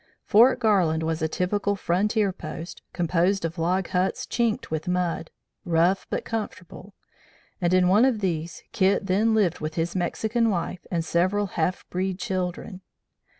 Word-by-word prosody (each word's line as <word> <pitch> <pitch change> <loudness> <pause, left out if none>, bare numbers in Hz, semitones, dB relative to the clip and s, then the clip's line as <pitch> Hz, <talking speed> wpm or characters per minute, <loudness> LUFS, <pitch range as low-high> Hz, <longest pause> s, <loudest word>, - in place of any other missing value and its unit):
Fort 240 +5 +5
Garland 180 -9 +2
was 160 0 -2
a 160 - +1
typical 200 +5 -1
frontier 200 +2 +1
post, 170 -1 -8
composed 175 +2 +1
of 165 +1 -4
log 180 +3 0
huts 185 +1 0
chinked 235 -7 -1
with 160 +2 -3
mud, 180 -2 -1 0.3
rough 175 +3 +2
but - - -3
comfortable, 205 -3 -6 0.7
and 175 -1 +2
in 185 -1 +4
one 205 +5 +5
of 255 -4 +2
these 170 -4 -3
Kit 195 +1 +2
then 210 +4 +2
lived 190 -6 +2
with 155 +1 -4
his 170 +2 -2
Mexican 220 +6 0
wife 180 -2 -3
and 165 -2 -1
several 185 +5 +1
half 175 +3 -1
breed 185 0 -1
children. 185 -2 -4
185 Hz, 150 wpm, -25 LUFS, 170-205 Hz, 0.7 s, Fort